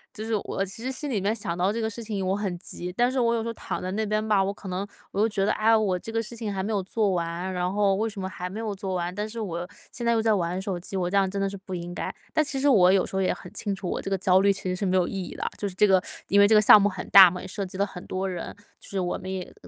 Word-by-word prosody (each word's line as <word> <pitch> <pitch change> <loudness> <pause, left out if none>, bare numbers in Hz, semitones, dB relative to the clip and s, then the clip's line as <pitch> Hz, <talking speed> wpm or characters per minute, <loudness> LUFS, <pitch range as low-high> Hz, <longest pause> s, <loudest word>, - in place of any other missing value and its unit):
就 215 - -5
是 225 - -2
我 195 - -2
其 195 +4 -10
实 260 - -2
心 285 +2 -5
里 205 -6 0
面 210 +3 +1
想 190 -6 -4
到 180 +3 +1
这 230 - -3
个 220 - 0
事 225 +1 -6
情 205 -3 -3
我 190 +1 +1
很 195 -4 -3
急， 180 0 -7
但 240 +7 +1
是 260 - -1
我 235 -1 +2
有 225 - -1
时 - - -4
候 230 - -3
躺 - - -5
在 185 - -3
那 220 +3 -1
边 215 +1 -1
吧， 205 -3 +3
我 195 - -1
可 200 -1 -11
能 185 +2 -2 0.3
我 - - -3
又 225 - +3
觉 200 -2 0
得， - - +2
哎 215 - -1
呀， 225 - +7
我 200 -4 +1
这 225 - -7
个 225 0 -1
事 235 - -8
情 220 -3 -4
还 190 -1 -2
没 215 +2 -2
有 200 - +1
做 205 +2 0
完， 175 +1 -2
然 180 0 -1
后 200 -1 +2
为 220 +3 0
什 210 - -8
么 190 - -3
还 180 -1 -6
没 205 +4 -6
有 215 -2 -3
做 190 -1 -4
完， 175 0 -2
但 210 +3 -3
是 230 - -6
我 175 -4 -4 0.2
现 240 - -7
在 235 - +3
又 225 -1 +1
在 220 - +4
玩 180 -1 -1
手 190 -2 -3
机， 195 +2 -6
我 180 -1 0
这 195 - -2
样 195 -1 +3
真 200 - -4
的 195 - +1
是 195 - -5
不 190 -1 -7
应 175 0 -6
该。 - - -3 0.2
但 310 - +3
其 275 -2 -3
实 285 - +2
我 185 -9 +6
有 190 -1 +3
时 - - -7
候 190 - +1
也 185 - +2
很 180 - -8
清 205 -2 -3
楚， 190 -2 -6
我 - - -2
这 - - -5
个 195 - +1
焦 185 0 +4
虑 200 +1 +4
其 195 - -4
实 185 -1 -1
是 195 +1 -2
没 185 - +2
有 180 -1 +2
意 - - -6
义 - - -8
的。 - - -4
就 205 - -1
是 185 - -7
这 210 - +5
个， 190 -2 +4 0.3
因 200 - +4
为 200 - +7
这 220 - +5
个 210 - +8
项 210 0 +8
目 205 - +3
很 185 -2 -7
大 190 -2 +10
嘛， 180 - -6
也 - - -9
涉 200 +2 -4
及 185 0 -7
了 200 - +2
很 180 -3 -9
多 190 +1 -2
人， 180 -2 -5 0.2
就 - - -13
是 195 - -2
我 180 -1 -1
们 185 +1 -6
也 185 -1 -5
195 Hz, 380 characters per minute, -26 LUFS, 185-215 Hz, 0.3 s, 大